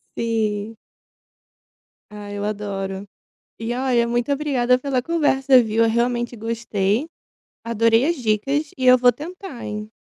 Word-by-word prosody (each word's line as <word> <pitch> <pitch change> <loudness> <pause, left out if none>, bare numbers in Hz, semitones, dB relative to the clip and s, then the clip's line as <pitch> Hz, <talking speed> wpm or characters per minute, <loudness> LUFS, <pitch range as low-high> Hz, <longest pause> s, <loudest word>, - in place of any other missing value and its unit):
Sim. 220 -1 -2 1.3
Ah, 210 -1 -9
eu 205 0 -4
adoro. 200 -2 -4 0.5
E 230 +1 -3
olha, 250 -2 +1
muito 240 +3 -1
obrigada 265 -4 +2
pela 260 -1 -1
conversa, 270 -4 +3
viu? 225 0 +1
Eu - - +2
realmente 240 +1 0
gostei. 225 +1 -1 0.6
Adorei 230 +2 +3
as 340 - 0
dicas 275 +5 -1
e 260 - -3
eu 255 0 +7
vou 245 0 +6
tentar, 345 -3 -9
hein? 210 0 -6
235 Hz, 130 wpm, -21 LUFS, 215-260 Hz, 1.3 s, eu